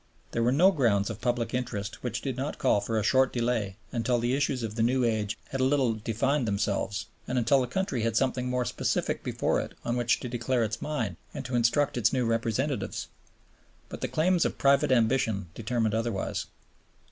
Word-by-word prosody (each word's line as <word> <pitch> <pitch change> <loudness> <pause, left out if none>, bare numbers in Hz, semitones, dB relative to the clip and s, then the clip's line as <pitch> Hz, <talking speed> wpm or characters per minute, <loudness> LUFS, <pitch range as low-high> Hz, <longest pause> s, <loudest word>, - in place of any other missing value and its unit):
There 115 - -1
were 120 +2 +3
no 175 +8 +6
grounds 115 - +2
of 110 0 -8
public 120 -1 -1
interest 115 -5 -3
which 120 -1 -3
did 135 -3 -2
not 135 +3 -3
call 100 - +2
for 110 +2 -2
a 110 - +1
short 130 +4 +3
delay 115 -5 -1 0.2
until 120 +1 +1
the 120 +1 0
issues 135 -2 0
of 110 -2 -3
the 110 - -2
new 125 +3 +2
age 110 -2 0
had 135 - -2
a - - +3
little 130 -3 +3
defined 115 +5 0
themselves 100 0 -1 0.2
and 130 - -1
until 125 +3 +4
the 125 - -1
country 160 - -1
had 115 -1 0
something 125 0 0
more 125 0 0
specific - - -1
before - - 0
it - - -8
on 120 - 0
which 120 -1 +2
to - - -4
declare 120 0 0
its 110 +1 -3
mind 115 - -2 0.2
and 140 -2 -5
to 130 0 -3
instruct 120 +3 +2
its 110 - +3
new 130 -2 +1
representatives. 115 +4 -1 0.8
But - - -8
the - - 0
claims 175 +2 +2
of - - -1
private 140 -1 +3
ambition 115 -6 +2
determined 115 0 -1
otherwise. 115 -3 -2
120 Hz, 200 wpm, -28 LUFS, 110-130 Hz, 0.8 s, no